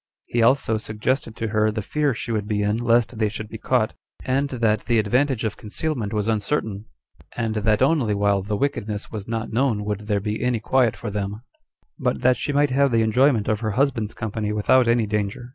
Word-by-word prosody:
He 120 Hz, -, 0 dB
also 115 Hz, -2 st, +3 dB
suggested 110 Hz, +2 st, -2 dB
to 115 Hz, -1 st, -3 dB
her 110 Hz, 0 st, +2 dB
the 110 Hz, 0 st, -3 dB
fear 145 Hz, +2 st, 0 dB
she 115 Hz, -, -4 dB
would 105 Hz, -2 st, -1 dB
be 105 Hz, -1 st, 0 dB
in 105 Hz, +2 st, +1 dB
lest 115 Hz, -2 st, +1 dB
they 110 Hz, -2 st, +2 dB
should 110 Hz, +1 st, -6 dB
be 110 Hz, -, -8 dB
caught; 115 Hz, -3 st, +1 dB, 0.3 s
and 135 Hz, +2 st, +1 dB
that 115 Hz, -5 st, 0 dB
the 120 Hz, -1 st, +2 dB
advantage 125 Hz, +4 st, +1 dB
of 110 Hz, -2 st, -2 dB
concealment 115 Hz, 0 st, -3 dB
was 105 Hz, -1 st, -1 dB
uncertain, 110 Hz, -1 st, -1 dB, 0.5 s
and 110 Hz, -2 st, -1 dB
that 105 Hz, +2 st, +2 dB
only 130 Hz, -8 st, +2 dB
while 100 Hz, -1 st, +2 dB
the 105 Hz, +2 st, -2 dB
wickedness 110 Hz, -6 st, -2 dB
was 105 Hz, -2 st, -6 dB
not 115 Hz, -1 st, -3 dB
known 115 Hz, -4 st, +1 dB
[would 105 Hz, 0 st, -4 dB
there 105 Hz, -2 st, +1 dB
be 105 Hz, +1 st, -3 dB
any 125 Hz, -1 st, +1 dB
quiet 120 Hz, +1 st, +2 dB
for 105 Hz, -, -6 dB
them]; 105 Hz, +2 st, -4 dB, 0.6 s
but 125 Hz, -1 st, -1 dB
that 125 Hz, -1 st, +4 dB
she 145 Hz, -, -2 dB
might 145 Hz, -1 st, +2 dB
have 140 Hz, +1 st, +3 dB
the 115 Hz, -1 st, +3 dB
enjoyment 115 Hz, 0 st, +3 dB
of 110 Hz, -1 st, +1 dB
her 110 Hz, -2 st, -2 dB
husband's 125 Hz, -6 st, 0 dB
company 105 Hz, -1 st, -3 dB
without 115 Hz, +4 st, +3 dB
any 115 Hz, -1 st, +3 dB
danger. 105 Hz, +3 st, -3 dB
110 Hz, 210 wpm, -23 LUFS, 105-125 Hz, 0.6 s, that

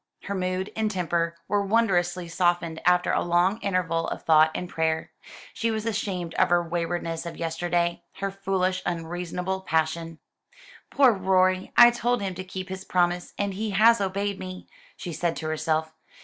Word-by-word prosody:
Her 200 Hz, -, -4 dB
mood 185 Hz, 0 st, -2 dB
and 220 Hz, -1 st, 0 dB
temper 170 Hz, -3 st, -1 dB
were 205 Hz, -1 st, +1 dB
wondrously 185 Hz, -5 st, +1 dB
softened 170 Hz, -1 st, 0 dB
after 180 Hz, 0 st, +4 dB
a -, -, +1 dB
long 175 Hz, +5 st, +2 dB
interval 180 Hz, -4 st, -1 dB
of -, -, -5 dB
thought 155 Hz, -1 st, +5 dB
and 180 Hz, -, -3 dB
prayer. 160 Hz, -1 st, -1 dB, 0.4 s
She 230 Hz, -, -1 dB
was 220 Hz, -1 st, -2 dB
ashamed 185 Hz, -6 st, -2 dB
of -, -, +4 dB
her 175 Hz, -1 st, +2 dB
waywardness 170 Hz, 0 st, -3 dB
of 170 Hz, -, -7 dB
yesterday 170 Hz, +1 st, -1 dB
her 195 Hz, 0 st, -3 dB
foolish 190 Hz, -1 st, -1 dB
unreasonable 175 Hz, +2 st, -3 dB
passion. 165 Hz, -1 st, -1 dB, 0.7 s
"Poor 270 Hz, -4 st, +5 dB
Rorie, 185 Hz, -1 st, +2 dB
I 240 Hz, 0 st, +9 dB
told 240 Hz, -1 st, 0 dB
him 190 Hz, -2 st, -2 dB
to 185 Hz, +1 st, -6 dB
keep 185 Hz, 0 st, -7 dB
his 190 Hz, 0 st, -6 dB
promise, 175 Hz, -1 st, 0 dB
and 200 Hz, -1 st, -1 dB
he 215 Hz, +3 st, -3 dB
has 230 Hz, +1 st, +6 dB
obeyed 200 Hz, +1 st, -2 dB
me," 185 Hz, 0 st, -8 dB, 0.3 s
she 175 Hz, -, -6 dB
said 170 Hz, +1 st, -1 dB
to 160 Hz, -, -6 dB
herself. 155 Hz, 0 st, -1 dB
180 Hz, 165 wpm, -26 LUFS, 170-195 Hz, 0.7 s, I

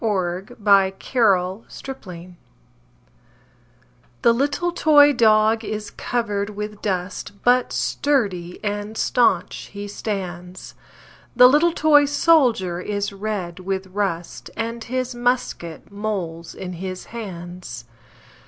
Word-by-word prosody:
Eugene 190 Hz, -3 st, -1 dB
Field 245 Hz, -, -14 dB
Little 195 Hz, 0 st, +3 dB, 0.2 s
Boy 270 Hz, -, -3 dB
Blue 180 Hz, -1 st, -10 dB, 1.9 s
THE 235 Hz, -, +6 dB
little 285 Hz, +7 st, 0 dB
toy 290 Hz, -3 st, +6 dB
dog 220 Hz, -1 st, +4 dB
is 210 Hz, 0 st, -5 dB
covered 210 Hz, -4 st, -2 dB
with 210 Hz, 0 st, -6 dB
dust, 185 Hz, 0 st, -3 dB
But 245 Hz, 0 st, +3 dB
sturdy 195 Hz, -12 st, -1 dB
and 205 Hz, +1 st, -3 dB
stanch 245 Hz, -1 st, +1 dB
he 205 Hz, 0 st, -6 dB
stands; 185 Hz, -4 st, -6 dB, 0.6 s
The 250 Hz, +1 st, +9 dB
little 300 Hz, +6 st, +4 dB
toy 295 Hz, -3 st, +4 dB
sholder 250 Hz, -, +3 dB
is 205 Hz, -1 st, -2 dB
covered 195 Hz, -4 st, -4 dB
with 190 Hz, +1 st, -3 dB
rust, 190 Hz, -4 st, -3 dB
And 230 Hz, 0 st, -3 dB
his 255 Hz, +1 st, -3 dB
musket 240 Hz, -9 st, -2 dB
molds 190 Hz, -6 st, -4 dB
in 185 Hz, -1 st, -6 dB
the 185 Hz, -1 st, -3 dB
hands. 175 Hz, -, -7 dB
205 Hz, 110 wpm, -22 LUFS, 185-240 Hz, 1.9 s, The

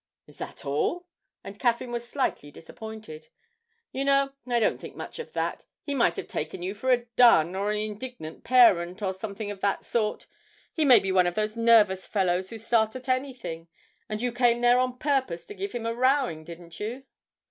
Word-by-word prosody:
'Is -, -, -17 dB
that -, -, -8 dB
all?' 150 Hz, -, -1 dB, 0.4 s
and 200 Hz, +2 st, -10 dB
Caffyn 240 Hz, 0 st, 0 dB
was 240 Hz, 0 st, -5 dB
slightly 255 Hz, -, -2 dB
disappointed. 165 Hz, -1 st, -10 dB, 0.6 s
'You 270 Hz, -, -2 dB
know, 275 Hz, 0 st, +3 dB, 0.2 s
I 240 Hz, -1 st, +2 dB
don't 220 Hz, -, +1 dB
think -, -, -9 dB
much -, -, -8 dB
of 475 Hz, -, -8 dB
that. -, -, -3 dB, 0.2 s
He 285 Hz, -, -3 dB
might 235 Hz, -11 st, +2 dB
have -, -, -5 dB
taken 155 Hz, +3 st, -5 dB
you 190 Hz, +2 st, -2 dB
for 220 Hz, +5 st, -4 dB
a 245 Hz, -2 st, +3 dB
dun, 180 Hz, -9 st, +6 dB
or 200 Hz, +2 st, -1 dB
an 210 Hz, -, -1 dB
indignant 215 Hz, -4 st, -6 dB
parent, 205 Hz, -6 st, +4 dB
or 190 Hz, -1 st, 0 dB
something 205 Hz, +2 st, -6 dB
of 195 Hz, -2 st, -9 dB
that 200 Hz, -1 st, 0 dB
sort; 215 Hz, -3 st, -1 dB, 0.5 s
he 315 Hz, -, +1 dB
may 255 Hz, -4 st, +8 dB
be 195 Hz, -2 st, 0 dB
one 185 Hz, -1 st, +4 dB
of 175 Hz, -, -2 dB
those 215 Hz, 0 st, -1 dB
nervous 220 Hz, -5 st, +4 dB
fellows 185 Hz, -2 st, 0 dB
who 225 Hz, -, -7 dB
start 220 Hz, 0 st, +1 dB
at 255 Hz, 0 st, -8 dB
anything, 255 Hz, -11 st, -3 dB, 0.4 s
and 215 Hz, +2 st, -3 dB
you 245 Hz, -, 0 dB
came 240 Hz, 0 st, +2 dB
there 245 Hz, +1 st, +5 dB
on 255 Hz, 0 st, 0 dB
purpose 265 Hz, -, -1 dB
to 415 Hz, -, -9 dB
give 400 Hz, 0 st, -5 dB
him 235 Hz, -2 st, -5 dB
a 230 Hz, -, -1 dB
rowing, 255 Hz, -, +1 dB
didn't 170 Hz, 0 st, -11 dB
you?' 235 Hz, +6 st, -5 dB
220 Hz, 200 wpm, -27 LUFS, 190-250 Hz, 0.6 s, may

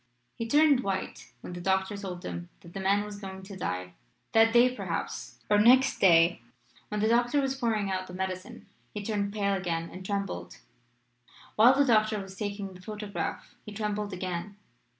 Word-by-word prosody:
"He 230 Hz, -, -4 dB
turned 290 Hz, +1 st, +5 dB
white 195 Hz, -6 st, -4 dB
when -, -, -8 dB
the 175 Hz, -, -6 dB
doctor 190 Hz, +2 st, +1 dB
told 185 Hz, -3 st, -6 dB
him 85 Hz, 0 st, -6 dB
that 170 Hz, -, -14 dB
the -, -, -5 dB
man 200 Hz, +2 st, +2 dB
was 205 Hz, -1 st, -8 dB
going 190 Hz, -1 st, -8 dB
to 195 Hz, +1 st, -9 dB
die 90 Hz, -, -4 dB, 0.4 s
that 225 Hz, 0 st, +5 dB
day, 245 Hz, +2 st, +5 dB
perhaps, -, -, -4 dB
or 210 Hz, 0 st, +4 dB
next 255 Hz, +5 st, +5 dB
day. 170 Hz, -5 st, +5 dB, 0.5 s
When 210 Hz, 0 st, -3 dB
the 215 Hz, -, +3 dB
doctor 240 Hz, +4 st, +3 dB
was 270 Hz, -1 st, 0 dB
pouring 220 Hz, -6 st, -1 dB
out 185 Hz, 0 st, -2 dB
the 180 Hz, -, -9 dB
medicine 190 Hz, +5 st, -5 dB, 0.3 s
he 210 Hz, -, -4 dB
turned 205 Hz, -1 st, -1 dB
pale 200 Hz, -1 st, 0 dB
again 170 Hz, -3 st, -2 dB
and 185 Hz, +1 st, -9 dB
trembled. 195 Hz, -, -4 dB, 1.0 s
While 240 Hz, +5 st, +7 dB
the 285 Hz, -, +5 dB
doctor 215 Hz, -3 st, +3 dB
was 195 Hz, -1 st, -9 dB
taking 200 Hz, -1 st, -4 dB
the 185 Hz, -, -13 dB
photograph 210 Hz, +1 st, -5 dB
he 210 Hz, -, -9 dB
trembled 210 Hz, 0 st, -2 dB
again. 185 Hz, +2 st, -4 dB
200 Hz, 180 wpm, -29 LUFS, 185-220 Hz, 1.0 s, While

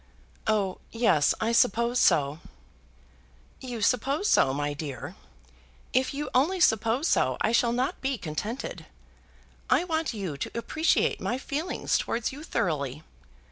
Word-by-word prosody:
"Oh, 205 Hz, -4 st, +1 dB
yes, 225 Hz, -11 st, +3 dB
I 225 Hz, -, 0 dB
suppose 235 Hz, +2 st, +3 dB
so." 145 Hz, -, +3 dB, 1.2 s
"You 245 Hz, -4 st, -5 dB
suppose 270 Hz, -, +1 dB
so, 135 Hz, -, +4 dB
my 145 Hz, +1 st, -2 dB
dear! 145 Hz, -4 st, -6 dB, 0.8 s
If 260 Hz, +1 st, +2 dB
you 290 Hz, +1 st, -4 dB
only 315 Hz, +9 st, +2 dB
suppose 230 Hz, -, +2 dB
so -, -, +2 dB
I 220 Hz, -, +1 dB
shall 235 Hz, 0 st, +3 dB
not 250 Hz, +2 st, -1 dB
be 270 Hz, -1 st, -1 dB
contented. 180 Hz, -, -5 dB, 0.8 s
I 320 Hz, -, +4 dB
want 325 Hz, -3 st, -1 dB
you 190 Hz, -, -4 dB
to 140 Hz, -, -5 dB
appreciate 310 Hz, +8 st, +1 dB
my 245 Hz, -, -1 dB
feelings 295 Hz, +6 st, -1 dB
towards 235 Hz, 0 st, -2 dB
you 280 Hz, +3 st, -9 dB
thoroughly. 155 Hz, -, -2 dB
235 Hz, 135 wpm, -27 LUFS, 165-270 Hz, 1.2 s, so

